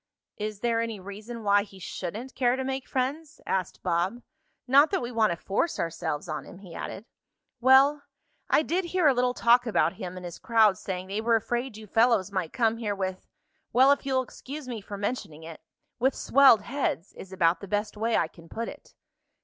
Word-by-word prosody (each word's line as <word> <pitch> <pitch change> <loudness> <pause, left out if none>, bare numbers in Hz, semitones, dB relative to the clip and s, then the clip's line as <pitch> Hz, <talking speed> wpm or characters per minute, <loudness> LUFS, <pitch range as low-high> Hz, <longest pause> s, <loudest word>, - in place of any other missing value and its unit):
"Is 210 -1 -5
there 230 -1 +1
any 225 -3 -4
reason 210 +5 -8
why 205 0 +4
he 200 -1 -11
shouldn't 200 +7 -6
care 245 -1 +2
to 265 - -3
make 265 0 -3
friends?" 285 +4 -3
asked 185 -2 -2
Bob. 185 +7 -1 0.4
"Not 280 +4 +6
that - - 0
we 240 0 -5
want 225 -2 +3
to 170 - -1
force 205 - -1
ourselves 165 -2 -3
on 155 -2 -4
him," - - -12
he 185 -3 -12
added. 200 - -6 0.5
"Well, 270 +4 +5 0.5
I 305 - +4
did 355 +4 -1
hear 360 0 0
a 280 - +6
little 250 0 +1
talk 240 +1 +4
about 180 -5 +1
him 185 -1 -6
and 180 - -8
his 175 - -8
crowd 220 -5 +3
saying 185 -1 -4
they 200 +3 -3
were 230 +1 +3
afraid 240 +1 -2
you 220 - -10
fellows 225 -2 +2
might 185 -5 -2
come 225 -2 +1
here 210 -3 -2
with 190 -1 -4 0.5
well, 260 +3 +6
if 285 - +2
you'll 265 -1 +1
excuse 275 +2 -9
me 235 -4 -5
for 200 +1 -8
mentioning 200 -7 -4
it 165 0 -10 0.4
with 265 +3 +2
swelled 260 -6 +5
heads, 245 - -2
is 190 - -11
about 170 -2 +2
the 200 - -9
best 205 +2 -2
way 225 +2 +1
I 165 - +1
can 165 0 -17
put 230 +1 -4
it." - - -11
220 Hz, 205 wpm, -27 LUFS, 190-255 Hz, 0.5 s, Not